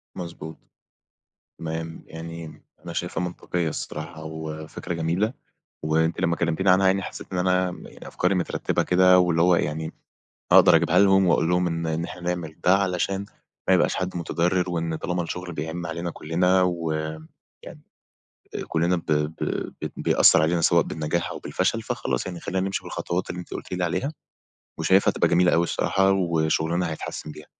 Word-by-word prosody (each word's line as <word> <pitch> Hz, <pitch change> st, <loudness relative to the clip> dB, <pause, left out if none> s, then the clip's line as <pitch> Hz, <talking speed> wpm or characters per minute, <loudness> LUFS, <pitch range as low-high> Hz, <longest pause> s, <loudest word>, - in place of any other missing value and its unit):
مضبوط، 85 Hz, -2 st, -7 dB, 1.0 s
تمام 80 Hz, 0 st, -5 dB
يعني 85 Hz, 0 st, -7 dB
م -, -, -14 dB, 0.2 s
أنا 85 Hz, -, -6 dB
شايفها 90 Hz, +1 st, -2 dB
منطقيّة 90 Hz, -1 st, -2 dB
الصراحة 80 Hz, +1 st, -6 dB
وفكرة 80 Hz, +1 st, -6 dB
جميلة 85 Hz, +8 st, 0 dB, 0.5 s
وأنتِ 80 Hz, +1 st, +1 dB
لما 85 Hz, 0 st, +1 dB
كلمتيني 85 Hz, +3 st, +1 dB
عنها 95 Hz, +1 st, +5 dB
يعني 95 Hz, +1 st, +3 dB
حسّيت -, -, -7 dB
إن 90 Hz, -, -1 dB
أنا 90 Hz, 0 st, +2 dB
م -, -, -10 dB
يعني -, -, -12 dB
أفكاري 90 Hz, +2 st, 0 dB
مترتّبة 90 Hz, -, 0 dB
كده 90 Hz, 0 st, +5 dB
واللي 85 Hz, -2 st, +3 dB
هو 90 Hz, 0 st, +5 dB
يعني 80 Hz, +2 st, -2 dB, 0.6 s
أقدَر -, -, +8 dB
اجيبها -, -, +3 dB
لهم 95 Hz, -1 st, +5 dB
واقول 85 Hz, -1 st, +3 dB
لهم 90 Hz, 0 st, +2 dB
إن 85 Hz, 0 st, -2 dB
إن 80 Hz, +1 st, -1 dB
إحنا 90 Hz, +1 st, -7 dB
نعمل 85 Hz, -3 st, -3 dB
ده 90 Hz, +2 st, +6 dB
علشان 95 Hz, 0 st, 0 dB, 0.4 s
ما -, -, +5 dB
يبقاش -, -, +3 dB
حد 90 Hz, -1 st, -3 dB
مُتضرّر 90 Hz, +2 st, 0 dB
وإن 85 Hz, -2 st, -2 dB
طالما 90 Hz, +1 st, -2 dB
الشغل 90 Hz, +1 st, -5 dB
بيعِم 80 Hz, +3 st, -4 dB
علينا 85 Hz, +1 st, -3 dB
كلّنا 90 Hz, +4 st, +2 dB
و 85 Hz, -3 st, 0 dB, 0.7 s
يعني -, -, -11 dB, 0.9 s
كلّنا 85 Hz, +2 st, +1 dB
ب 85 Hz, -, -6 dB
ب 75 Hz, +1 st, +1 dB, 0.5 s
بت -, -, -4 dB
بيأثّر -, -, +5 dB
علينا 85 Hz, +2 st, +2 dB
سواء 85 Hz, +1 st, +4 dB
بالنجاح 80 Hz, +2 st, -2 dB
أو -, -, -6 dB
بالفشل -, -, -1 dB
فخلاص، -, -, -2 dB
يعني 90 Hz, -2 st, -6 dB
خلّينا 95 Hz, +2 st, -2 dB
نمشِي 95 Hz, -, -2 dB
بالخطوات 90 Hz, +2 st, -3 dB
اللي 90 Hz, -, -4 dB
أنتِ 90 Hz, -, -8 dB
قُلتِ -, -, -7 dB
لي 90 Hz, 0 st, -1 dB
عليها 135 Hz, -, -1 dB, 0.7 s
وشايفها 95 Hz, +1 st, +4 dB
هتبقى -, -, +2 dB
جميلة 90 Hz, +1 st, +4 dB
أوي 85 Hz, -, +4 dB
الصراحة 95 Hz, +3 st, +2 dB
وشغلنا 85 Hz, -1 st, +1 dB
هيتحسّن 75 Hz, 0 st, -6 dB
بيها. 75 Hz, 0 st, -12 dB
85 Hz, 165 wpm, -24 LUFS, 80-90 Hz, 1.0 s, أقدَر